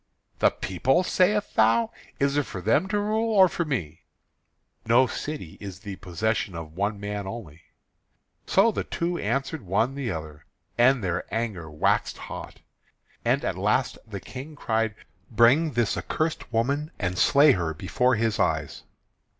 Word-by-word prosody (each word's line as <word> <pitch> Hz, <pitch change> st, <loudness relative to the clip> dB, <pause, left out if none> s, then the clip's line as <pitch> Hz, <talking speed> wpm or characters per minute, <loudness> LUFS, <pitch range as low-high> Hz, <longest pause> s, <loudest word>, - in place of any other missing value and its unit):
"The -, -, +5 dB
people, 130 Hz, -, 0 dB
sayest 200 Hz, +3 st, +2 dB
thou? 115 Hz, +1 st, +4 dB, 0.3 s
Is 140 Hz, 0 st, +1 dB
it 145 Hz, -1 st, +1 dB
for 95 Hz, -, -6 dB
them 115 Hz, -, +2 dB
to 205 Hz, +1 st, 0 dB
rule, 220 Hz, +2 st, 0 dB
or 190 Hz, -2 st, +8 dB
for 170 Hz, -1 st, -2 dB
me?" 90 Hz, -, -3 dB, 0.8 s
"No 120 Hz, +3 st, +5 dB
city 145 Hz, -, -6 dB
is 100 Hz, -2 st, -8 dB
the 100 Hz, -4 st, -7 dB
possession 95 Hz, +1 st, -2 dB
of 80 Hz, -2 st, -7 dB
one 100 Hz, +2 st, -1 dB
man 100 Hz, -1 st, -4 dB
only." 90 Hz, -8 st, -8 dB, 0.9 s
So 205 Hz, +4 st, +4 dB
the -, -, -2 dB
two 175 Hz, +1 st, -2 dB
answered 135 Hz, +7 st, -2 dB
one 105 Hz, +6 st, 0 dB
the 135 Hz, -3 st, -3 dB
other, 75 Hz, -4 st, -6 dB, 0.3 s
and 125 Hz, 0 st, +4 dB
their 90 Hz, 0 st, -2 dB
anger 105 Hz, -7 st, -3 dB
waxed 75 Hz, 0 st, 0 dB
hot. -, -, -8 dB, 0.6 s
And -, -, +1 dB
at -, -, 0 dB
the -, -, -8 dB
last -, -, +1 dB
the 100 Hz, -3 st, -6 dB
King 135 Hz, -, -9 dB
cried: 110 Hz, -5 st, -1 dB, 0.3 s
"Bring 130 Hz, +7 st, +4 dB
this 120 Hz, -2 st, +1 dB
accursed 155 Hz, -4 st, -2 dB
woman, 140 Hz, +7 st, 0 dB
and 90 Hz, -2 st, -2 dB
slay 145 Hz, +9 st, +6 dB
her 85 Hz, -8 st, 0 dB
before 125 Hz, -, +1 dB
his 110 Hz, -1 st, 0 dB
eyes." -, -, 0 dB
115 Hz, 160 wpm, -26 LUFS, 95-145 Hz, 0.9 s, or